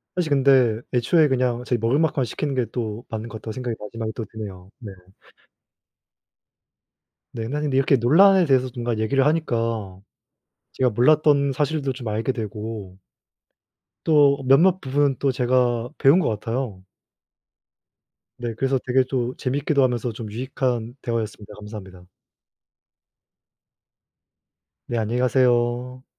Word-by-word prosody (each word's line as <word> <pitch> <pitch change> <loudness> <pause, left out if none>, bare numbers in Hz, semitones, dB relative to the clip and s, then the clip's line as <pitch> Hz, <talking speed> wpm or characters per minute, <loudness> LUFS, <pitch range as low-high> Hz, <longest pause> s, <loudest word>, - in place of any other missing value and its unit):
사실 175 -3 -1
근데 130 -5 +3
애초에 150 +6 +3
그냥 125 -2 0
제가 120 -1 0
먹을 115 +7 +1
만큼만 145 -5 +1
시키는 140 +5 -3
게 125 -2 +1
또 115 -1 -4
맞는 110 +1 -5
것 110 - -7
같다고 110 0 -7
생각이 125 -2 -4
마지막에 110 +1 -5
또 115 - -5
드네요. 100 -5 -9
네. 110 -5 -9 2.4
네. 115 -1 -5
난인데 145 -1 -2
이렇게 135 +1 +3
논란에 180 - +5
대해서 130 -3 +2
뭔가 120 -2 -2
얘기를 135 +5 +1
하니까 115 - -1 0.7
제가 130 -1 +1
몰랐던 140 +4 +3
사실도 145 0 -1
좀 125 -2 -8
알게 110 +4 -1
되고 105 -4 -6 1.1
또 145 -3 +4
몇몇 170 +8 +5
부분은 140 +1 +1
또 140 - +1
제가 125 -1 +1
배운 145 +5 +5
것 185 - 0
같아요. 115 -3 -4 1.5
네. 120 -1 -4
그래서 135 +4 0
되게 130 +1 +3
또 125 -2 -1
재밌기도 140 +2 0
하면서 120 -2 0
좀 110 -1 -8
유익한 120 0 -3
대화였습니다. 110 -3 -4
감사합니다. 95 -4 -10 2.8
네. 120 -1 -2
안녕히 115 +3 -1
가세요. 125 0 +1
125 Hz, 285 characters per minute, -23 LUFS, 115-135 Hz, 2.8 s, 논란에